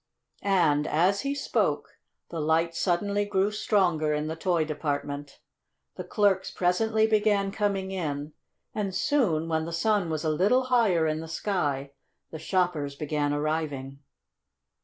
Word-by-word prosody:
And, 160 Hz, -7 st, +2 dB
as 185 Hz, +6 st, +2 dB
he 280 Hz, +1 st, -2 dB
spoke, -, -, -1 dB, 0.3 s
the 165 Hz, -, -4 dB
light 160 Hz, +2 st, +1 dB
suddenly 200 Hz, +4 st, 0 dB
grew 200 Hz, 0 st, +1 dB
stronger 175 Hz, -8 st, +1 dB
in 150 Hz, 0 st, -2 dB
the 160 Hz, +1 st, -3 dB
toy 165 Hz, -1 st, +1 dB
department, 145 Hz, -2 st, -4 dB, 0.6 s
the -, -, -5 dB
clerks 200 Hz, -3 st, +1 dB
presently 220 Hz, +5 st, +1 dB
began 210 Hz, -2 st, +2 dB
coming 195 Hz, -2 st, -1 dB
in, 150 Hz, -5 st, -3 dB, 0.4 s
and 195 Hz, -3 st, -2 dB
soon, 200 Hz, -, +1 dB
when 160 Hz, -1 st, 0 dB
the 170 Hz, -, -5 dB
sun 200 Hz, +1 st, +1 dB
was 155 Hz, 0 st, -2 dB
a 160 Hz, -, +1 dB
little 205 Hz, +11 st, +3 dB
higher 195 Hz, -9 st, +4 dB
in 155 Hz, 0 st, 0 dB
the 160 Hz, -, -7 dB
sky, 150 Hz, -6 st, -2 dB, 0.4 s
the 160 Hz, -, -7 dB
shoppers 160 Hz, -5 st, 0 dB
began 145 Hz, 0 st, -1 dB
arriving. 145 Hz, -3 st, -2 dB
170 Hz, 140 wpm, -27 LUFS, 155-200 Hz, 0.6 s, higher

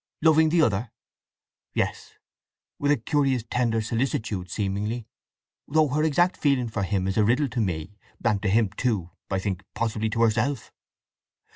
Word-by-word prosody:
"Loving 160 Hz, 0 st, +5 dB
the 165 Hz, 0 st, +4 dB
other?" 105 Hz, -2 st, 0 dB, 0.8 s
"Yes; -, -, -2 dB, 0.7 s
with 145 Hz, -, 0 dB
a 145 Hz, -, +4 dB
curious 135 Hz, 0 st, +1 dB
tender 115 Hz, -2 st, +1 dB
solicitude 110 Hz, -5 st, -2 dB
seemingly; 105 Hz, +4 st, -2 dB, 0.6 s
though 155 Hz, 0 st, +3 dB
her 145 Hz, +4 st, +1 dB
exact 175 Hz, +4 st, +2 dB
feeling 135 Hz, -5 st, +1 dB
for 110 Hz, -, -3 dB
him 95 Hz, -1 st, 0 dB
is 95 Hz, -, -2 dB
a 105 Hz, -, +5 dB
riddle 130 Hz, +6 st, +2 dB
to 120 Hz, -, -3 dB
me—and 100 Hz, +4 st, -3 dB
to 100 Hz, -, 0 dB
him 110 Hz, 0 st, +3 dB
too, 105 Hz, -9 st, -1 dB, 0.2 s
I 95 Hz, -, 0 dB
think—possibly 105 Hz, +3 st, -2 dB
to 115 Hz, +2 st, +1 dB
herself. 115 Hz, +4 st, 0 dB
115 Hz, 145 wpm, -25 LUFS, 100-140 Hz, 0.8 s, Loving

